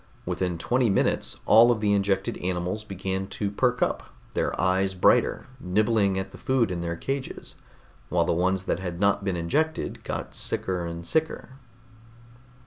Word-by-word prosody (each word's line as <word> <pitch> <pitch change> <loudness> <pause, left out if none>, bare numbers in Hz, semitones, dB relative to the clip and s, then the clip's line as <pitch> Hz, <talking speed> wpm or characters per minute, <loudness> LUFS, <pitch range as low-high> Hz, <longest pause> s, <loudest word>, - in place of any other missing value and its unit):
Within 90 -2 -2
twenty 120 +7 +1
minutes 95 - +1
all 115 +2 +7
of 120 -2 +2
the 105 -1 +2
injected 100 -1 0
animals 90 +3 -2
began 95 -1 -3
to 100 0 -3
perk 125 +4 +1
up, - - -1 0.3
their - - -1
eyes 95 +1 +1
brighter, 90 - +3
nibbling 100 +1 +1
at 95 - -4
the - - -12
food 130 -5 +1
in 85 -1 -3
their 85 0 -2
cages, 135 +8 -5 0.6
while 85 -1 +2
the - - +1
ones 95 +2 +1
that 95 - -1
had 90 -2 -5
not 100 0 +2
been 95 -2 -1
injected 155 - -1
got - - -5
sicker 90 -2 -2
and 85 0 -6
sicker. 160 - -1
95 Hz, 160 wpm, -26 LUFS, 90-110 Hz, 0.6 s, all